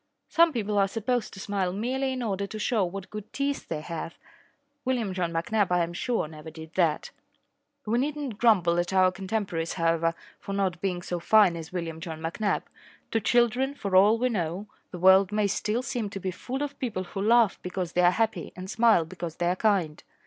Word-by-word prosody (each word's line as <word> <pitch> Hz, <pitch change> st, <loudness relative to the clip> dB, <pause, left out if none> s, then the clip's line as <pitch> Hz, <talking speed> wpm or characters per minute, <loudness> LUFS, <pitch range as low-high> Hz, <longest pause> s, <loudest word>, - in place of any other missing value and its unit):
Some 335 Hz, 0 st, +5 dB
people 210 Hz, -5 st, -1 dB
are 195 Hz, -, +4 dB
supposed 225 Hz, +3 st, -1 dB
to -, -, -9 dB
smile 195 Hz, -2 st, -1 dB
merely 260 Hz, +7 st, -1 dB
in 255 Hz, -1 st, -3 dB
order 200 Hz, -2 st, -2 dB
to 215 Hz, -, -7 dB
show 215 Hz, 0 st, +1 dB
what 190 Hz, +1 st, -5 dB
good 210 Hz, 0 st, -8 dB
teeth 280 Hz, 0 st, -2 dB
they 155 Hz, -2 st, -3 dB
have. 165 Hz, +1 st, -6 dB, 0.7 s
William 240 Hz, -7 st, -1 dB
John 180 Hz, -2 st, -1 dB
McNabb, 195 Hz, +5 st, +1 dB
I 180 Hz, -1 st, +3 dB
am 170 Hz, +1 st, -4 dB
sure, 230 Hz, 0 st, -1 dB
never 155 Hz, 0 st, -10 dB
did 160 Hz, +1 st, -11 dB
that. 170 Hz, -5 st, +1 dB, 0.7 s
We 225 Hz, +3 st, +1 dB
need 290 Hz, +3 st, -1 dB
not 270 Hz, -8 st, -5 dB
grumble 180 Hz, -8 st, +4 dB
at 175 Hz, +2 st, -1 dB
our 185 Hz, -1 st, +5 dB
contemporaries, 190 Hz, -3 st, -3 dB
however, 165 Hz, -1 st, +1 dB, 0.2 s
for 195 Hz, -, -6 dB
not 190 Hz, -3 st, -1 dB
being 180 Hz, -3 st, -2 dB
so 175 Hz, -1 st, -3 dB
fine 200 Hz, 0 st, +5 dB
as 165 Hz, -1 st, -7 dB
William 165 Hz, -3 st, -4 dB
John 165 Hz, -2 st, -6 dB
McNabb. 170 Hz, +6 st, -1 dB, 0.5 s
To 225 Hz, -, +2 dB
children, 245 Hz, +5 st, +2 dB
for 200 Hz, -8 st, -2 dB
all 205 Hz, +4 st, +6 dB
we 250 Hz, +2 st, +1 dB
know, 180 Hz, -2 st, -2 dB, 0.2 s
the 180 Hz, -, -7 dB
world 190 Hz, +2 st, +6 dB
may 210 Hz, 0 st, +1 dB
still 210 Hz, +4 st, -1 dB
seem 235 Hz, -4 st, -3 dB
to 195 Hz, -, -6 dB
be 190 Hz, 0 st, -3 dB
full 255 Hz, +9 st, -4 dB
of 285 Hz, -1 st, -6 dB
people 220 Hz, -8 st, -2 dB
who 195 Hz, +2 st, -6 dB
laugh 225 Hz, 0 st, +4 dB
because 180 Hz, -1 st, -4 dB
they 180 Hz, -, +2 dB
are 175 Hz, -, +6 dB
happy 220 Hz, +4 st, -1 dB
and 185 Hz, +2 st, -7 dB
smile 225 Hz, -7 st, +4 dB
because 165 Hz, 0 st, -6 dB
they 175 Hz, -, -2 dB
are -, -, 0 dB
kind. 185 Hz, -7 st, +1 dB
195 Hz, 205 wpm, -27 LUFS, 175-225 Hz, 0.7 s, all